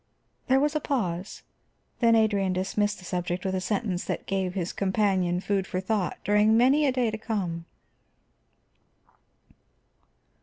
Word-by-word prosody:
There 265 0 +4
was 295 +2 +1
a - - +2
pause, 190 - -3 0.6
then 230 -2 +5
Adrian 205 -4 +2
dismissed 205 +3 0
the 180 - -13
subject 180 +1 -3
with 190 - -1
a 185 - -1
sentence 195 -2 -1
that - - -3
gave 190 -1 -2
his 180 -2 -2
companion 190 -3 +1
food 195 -1 -1
for 185 - -2
thought 190 0 -1
during 210 +2 +4
many 275 +5 +4
a - - +3
day 250 -3 0
to 220 - -5
come. 185 -7 -3
200 Hz, 145 wpm, -27 LUFS, 185-225 Hz, 0.6 s, then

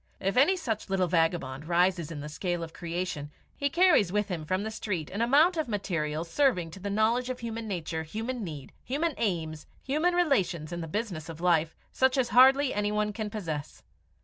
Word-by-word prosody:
If 195 +1 -1
any 295 +9 +5
such 225 - -3
little 190 -1 +2
vagabond 165 -4 0
rises 175 -1 +2
in 155 -3 -6
the 150 - -6
scale 175 +3 -3
of 165 - -8
creation, 170 -4 -4 0.3
he 280 - 0
carries 325 - +4
with 210 0 0
him 165 -4 -4
from 185 +4 -1
the 220 - -3
street 190 -8 -4
an 205 - -3
amount 300 +9 +4
of 315 -4 0
material 165 -8 -2
serving 180 - +1
to 190 - -10
the 200 +2 -4
knowledge 225 +5 +1
of 255 -1 -4
human 230 -1 -4
nature, 170 -4 -3
human 225 +9 -4
need, 150 -7 -7
human 305 +5 -1
aims, 160 -7 -2 0.2
human 310 +6 +1
relations 185 - +1
in 175 - -4
the 165 - -5
business 175 -4 -4
of 165 -1 -8
life, 165 -2 +2 0.2
such 260 +1 +2
as 255 -2 +2
hardly 265 +2 +6
another 210 0 0
can 215 0 -4
possess. 165 -9 -5
195 Hz, 195 wpm, -28 LUFS, 165-245 Hz, 0.3 s, hardly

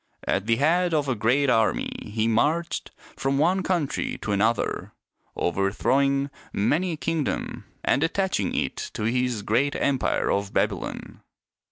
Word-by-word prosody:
At 100 - 0
the 115 - +4
head 170 +6 +2
of 145 -2 +1
a 130 - +2
great 125 +6 +2
army 115 -4 +2
he 110 +1 -1
marched 150 +10 +1 0.3
from 135 +1 0
one 180 +6 +3
country 175 -6 -1
to 105 - -2
another, 110 +4 0 0.4
overthrowing 135 +10 +1 0.2
many 160 - +1
a - - -5
kingdom 160 -2 -2 0.2
and - - +3
attaching 165 - 0
it - - -1 0.2
to - - -3
his 120 -1 0
great 130 +8 +1
empire 135 -2 +1
of 100 0 -1
Babylon. - - -2
135 Hz, 140 wpm, -25 LUFS, 110-155 Hz, 0.4 s, the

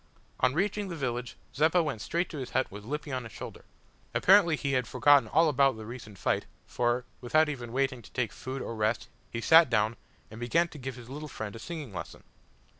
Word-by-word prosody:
On 130 +2 +2
reaching 205 +3 0
the 175 - -5
village, 125 -4 -3 0.2
Zeppa 160 +4 +3
went 135 -9 -3
straight 170 +8 -1
to 155 - -5
his 130 - -5
hut 130 - 0
with 100 +1 -9
Lippy 150 +5 -4
on 130 -1 -2
his 115 - -9
shoulder. - - -9 0.5
Apparently 185 -4 +6
he 140 -2 -2
had 130 -2 +1
forgotten 145 -1 +5
all 165 +1 +4
about 135 -4 +3
the 110 - -8
recent 110 -3 -9
fight 80 - 0 0.2
for, 120 +1 0
without 155 +5 +3
even 120 -5 -5
waiting 135 -1 0
to - - -15
take 120 -5 -1
food 130 0 -5
or - - -5
rest 110 +1 -1 0.2
he 115 - -4
sat 160 +2 +7
down, 110 -1 +2 0.4
and 110 - -9
began 165 +9 +2
to 150 - -11
give 130 -1 -5
his 120 -2 -11
little 150 +4 -7
friend 110 -4 -6
a - - -8
singing 150 - -6
lesson! - - -7
130 Hz, 215 wpm, -29 LUFS, 120-155 Hz, 0.5 s, sat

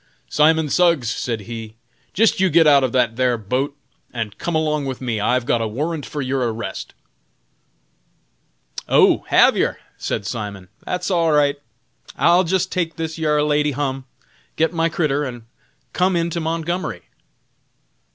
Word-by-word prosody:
"Simon 160 +1 +3
Suggs," 165 -7 +2
said 115 -3 -3
he, 110 0 -8 0.4
"jist 225 +1 +2
you 190 0 +3
git 165 0 +5
out 140 -2 +6
of 130 - 0
that 120 -3 +1
thar 125 -2 +2
boat 130 +7 -2 0.3
and 115 -4 -4
come 170 - -2
along 150 -2 0
with 130 -2 -4
me; 120 -4 -2
I've 125 +4 +1
got 120 -3 +1
a 115 - -1
warrant 150 +7 -3
for 145 -2 -4
your 130 -2 -1
arrest!" 95 - -6 1.9
"Oh! - - +4
hav - - +5
yer?" - - 0 0.2
said 105 - -3
Simon, 100 -3 -6
"that's 180 +1 -3
all 165 -3 +2
right; 145 -1 +3 0.6
I'll 175 +2 +4
jist 185 +1 0
take 170 -3 -2
this 160 0 -5
yar 150 -2 +2
lady 150 -1 +1
hum, 135 -1 -3 0.5
git 165 +2 +1
my 165 0 +1
critter, 150 -3 0
and 120 -4 -6 0.5
come 185 +1 +2
in 170 0 0
to 170 - -2
Montgomery." 165 +2 -3
145 Hz, 155 wpm, -20 LUFS, 120-165 Hz, 1.9 s, out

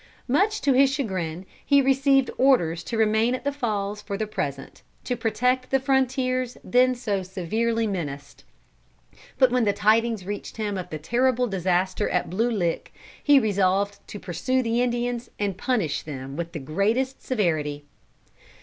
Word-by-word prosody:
Much 400 - +2
to 275 - +3
his 270 +1 +5
chagrin, 185 - -3 0.2
he 280 -1 +4
received 270 0 +3
orders 175 -12 +3
to 230 - -4
remain 220 +2 +2
at 255 - -8
the 285 - 0
Falls 210 -6 -3
for 200 -1 -5
the 215 - -1
present, 140 -9 -5 0.2
to 250 - -2
protect 250 +3 0
the 270 - +2
frontiers 255 -2 0
then 255 +1 +3
so 210 -6 -2
severely 220 +5 -1
menaced. 145 -8 -5 0.9
But 260 -2 +5
when 250 -1 +2
the 205 -2 +2
tidings 220 0 +2
reached 205 +3 -6
him 210 -2 -2
of 180 -1 -5
the 155 - -4
terrible 250 - +1
disaster 185 -2 0
at 180 - +1
the 175 - -9
Blue 230 +4 +2
Lick, 180 -8 -2 0.3
he 290 -1 +6
resolved 200 -2 +1
to 205 - -8
pursue 225 +10 -1
the 230 +1 +1
Indians 240 0 -1
and 200 -2 -1
punish 195 - -1
them 135 -2 -7
with 170 +1 -5
the - - -4
greatest 215 - -1
severity. 155 - -1
220 Hz, 160 wpm, -25 LUFS, 185-255 Hz, 0.9 s, he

